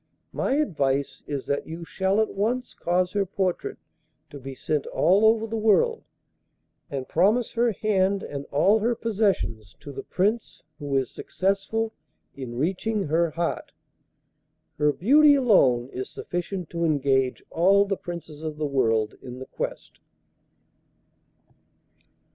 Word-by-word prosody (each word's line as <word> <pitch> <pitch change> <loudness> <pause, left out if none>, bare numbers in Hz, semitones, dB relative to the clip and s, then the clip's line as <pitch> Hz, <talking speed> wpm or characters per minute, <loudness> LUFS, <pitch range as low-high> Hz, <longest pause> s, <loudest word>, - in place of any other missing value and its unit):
My 270 - 0
advice 140 - 0
is 140 -2 -4
that 140 - -2
you 165 +1 -7
shall 190 +4 0
at 220 - +1
once 235 +6 -1
cause 180 +1 0
her 205 -1 +1
portrait 190 -1 -2 0.5
to 145 - -8
be 135 0 -8
sent 150 +3 -2
all 195 +4 +3
over 220 0 +4
the 225 0 -3
world, 455 - +3 0.9
and 135 -2 -4
promise 210 +8 +2
her 235 0 +2
hand 200 -2 +1
and 140 -1 -6
all 195 +10 +3
her 235 +3 +1
possessions 195 - -1
to 145 - -9
the 135 - -6
Prince 210 +5 -1 0.2
who 145 -2 -3
is 130 - -1
successful 200 +4 -1 0.4
in 125 -3 -7
reaching 195 - -1
her 165 +2 +2
heart. 170 +2 -3 1.1
Her 150 0 +4
beauty 285 - +5
alone 135 - +4
is 130 0 -5
sufficient 175 0 -5
to 170 0 -2
engage 135 -4 +1
all 195 +4 +4
the 195 0 -1
Princes 170 -5 -8
of 155 -1 -5
the 155 - -1
world 115 -6 +1
in 125 -1 -8
the 130 - -7
quest. - - -6
175 Hz, 140 wpm, -25 LUFS, 140-215 Hz, 1.1 s, beauty